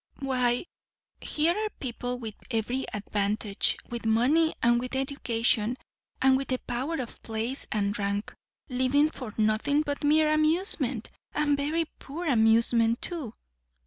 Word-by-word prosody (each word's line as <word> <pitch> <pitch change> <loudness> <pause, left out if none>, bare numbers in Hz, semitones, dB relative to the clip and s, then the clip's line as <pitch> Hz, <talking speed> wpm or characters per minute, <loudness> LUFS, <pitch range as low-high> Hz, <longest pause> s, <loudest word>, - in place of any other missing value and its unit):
"Why, 250 -1 +1 0.5
here 320 +3 +1
are 430 0 -1
people 245 -1 -3
with 225 -3 -6 0.2
every 240 +3 -1
advantage, 205 0 0
with 235 -1 -5
money 255 +9 +3
and 240 0 +4
with 255 +2 -4
education, 245 -3 0 0.4
and 265 0 +5
with 275 - -3
the 255 - 0
power 255 +7 -3
of 245 -3 -7
place 225 +4 -4
and 205 -1 0
rank, 200 +1 -2 0.3
living 265 +4 +2
for 250 -8 -7
nothing 220 +8 +2
but 285 -1 -4
mere 305 +1 +4
amusement, 310 - +1 0.2
and 295 -1 +2
very 305 +4 0
poor 320 +6 -6
amusement 230 -2 +4
too." 300 -11 -2
255 Hz, 135 wpm, -28 LUFS, 225-290 Hz, 0.5 s, and